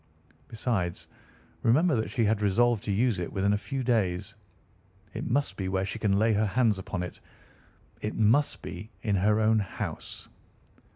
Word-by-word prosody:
Besides, 105 Hz, -6 st, -2 dB, 0.5 s
remember 150 Hz, +7 st, +4 dB
that 110 Hz, -1 st, -1 dB
she 115 Hz, -, +1 dB
had 105 Hz, 0 st, +1 dB
resolved 110 Hz, +2 st, +2 dB
to 105 Hz, -, -1 dB
use 110 Hz, 0 st, +1 dB
it 85 Hz, -, -4 dB
within 100 Hz, +1 st, +1 dB
a -, -, +2 dB
few 130 Hz, +7 st, -4 dB
days. 105 Hz, -5 st, 0 dB, 0.8 s
It -, -, -4 dB
must 130 Hz, -6 st, 0 dB
be 95 Hz, -1 st, -2 dB
where 95 Hz, 0 st, 0 dB
she 95 Hz, -, -5 dB
can 100 Hz, -2 st, +2 dB
lay 110 Hz, +2 st, +3 dB
her 105 Hz, +1 st, +2 dB
hands 110 Hz, -2 st, +2 dB
upon 90 Hz, -1 st, -4 dB
it. 90 Hz, -, -7 dB, 0.8 s
It 105 Hz, -, -3 dB
must 115 Hz, +7 st, +2 dB
be 110 Hz, -, -7 dB
in 105 Hz, -3 st, +1 dB
her 105 Hz, +3 st, +3 dB
own 110 Hz, 0 st, +4 dB
house." 100 Hz, -, -5 dB
105 Hz, 170 wpm, -28 LUFS, 95-115 Hz, 0.8 s, remember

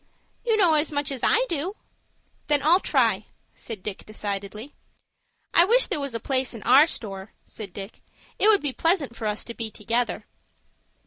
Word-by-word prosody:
"You 455 Hz, -2 st, +2 dB
know 360 Hz, -6 st, +5 dB
as 305 Hz, 0 st, +2 dB
much 285 Hz, -1 st, -1 dB
as 265 Hz, -3 st, -4 dB
I -, -, +3 dB
do." 340 Hz, -, -3 dB, 0.7 s
"Then 295 Hz, -1 st, +2 dB
I'll 335 Hz, +5 st, +5 dB
try," -, -, +1 dB, 0.3 s
said 215 Hz, -5 st, -8 dB
Dick, 205 Hz, -2 st, -5 dB
decidedly. 210 Hz, +4 st, -5 dB, 0.8 s
"I 340 Hz, -, +7 dB
wish 475 Hz, +7 st, +4 dB
there -, -, -2 dB
was 280 Hz, -4 st, -4 dB
a -, -, -1 dB
place 260 Hz, +1 st, -1 dB
in 220 Hz, -, -9 dB
our 270 Hz, +6 st, +6 dB
store," 195 Hz, -, -5 dB
said 215 Hz, -3 st, -8 dB
Fosdick. 195 Hz, +1 st, -8 dB, 0.4 s
"It -, -, +4 dB
would 430 Hz, -2 st, +5 dB
be 285 Hz, -3 st, -2 dB
pleasant 325 Hz, -7 st, +1 dB
for 220 Hz, -, -4 dB
us 210 Hz, 0 st, -2 dB
to 235 Hz, -, -7 dB
be 230 Hz, -1 st, -4 dB
together." 230 Hz, +3 st, -2 dB
265 Hz, 180 wpm, -25 LUFS, 215-320 Hz, 0.8 s, I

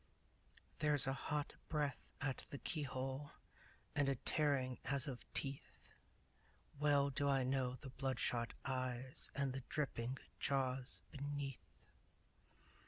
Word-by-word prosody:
There's 150 Hz, -2 st, +6 dB
a 135 Hz, -, +2 dB
hot 145 Hz, +1 st, -2 dB
breath 145 Hz, -5 st, +1 dB, 0.2 s
at 135 Hz, -3 st, -1 dB
the 140 Hz, -, -4 dB
keyhole 135 Hz, -1 st, -2 dB, 0.6 s
And 145 Hz, -1 st, +4 dB
a 135 Hz, -, +3 dB
tearing 130 Hz, -2 st, +2 dB
as 140 Hz, -2 st, +2 dB
of 130 Hz, -3 st, -6 dB
teeth! 135 Hz, -1 st, -2 dB, 1.0 s
Well 145 Hz, -1 st, +4 dB
do 140 Hz, +1 st, +2 dB
I 135 Hz, -1 st, +4 dB
know 130 Hz, -1 st, +1 dB
the 130 Hz, 0 st, -8 dB
bloodshot 125 Hz, -3 st, 0 dB
eyes 130 Hz, -1 st, +1 dB
And 140 Hz, -1 st, +1 dB
the 135 Hz, -, -3 dB
dripping 130 Hz, -3 st, -1 dB, 0.2 s
jaws 130 Hz, -1 st, 0 dB
beneath! 140 Hz, -1 st, -3 dB
135 Hz, 115 wpm, -41 LUFS, 130-145 Hz, 1.0 s, There's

